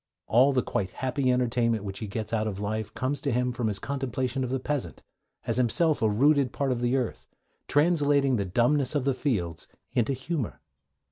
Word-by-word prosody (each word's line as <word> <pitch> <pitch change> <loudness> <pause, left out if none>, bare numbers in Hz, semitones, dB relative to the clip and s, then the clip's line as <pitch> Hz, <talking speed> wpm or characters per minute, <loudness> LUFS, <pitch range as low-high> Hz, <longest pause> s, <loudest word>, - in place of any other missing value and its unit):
All 130 +5 +5
the 130 -2 +1
quite 95 -2 -2
happy 130 +5 0
entertainment 120 -3 +1
which 95 -1 -5
he 110 - -4
gets 110 +2 -5
out 110 -1 +1
of 100 -2 -4
life 105 +1 -3
comes 135 +3 -1
to 140 - -1
him 125 +1 +1
from 120 -2 -2
his 105 -2 -1
contemplation 130 0 -2
of 125 - -2
the 130 +1 -1
peasant, 145 +1 -3 0.4
as - - 0
himself 150 +6 +2
a 110 - +3
rooted 140 +5 +3
part 140 -2 -1
of 120 -1 -1
the 120 +2 +1
earth, 125 -4 -3 0.4
translating 145 -3 +3
the 100 - 0
dumbness 125 +9 +1
of 140 -3 0
the 135 - +2
fields 100 - -2 0.3
into 120 +3 +1
humour. 130 -1 -3
125 Hz, 195 wpm, -27 LUFS, 110-140 Hz, 0.4 s, All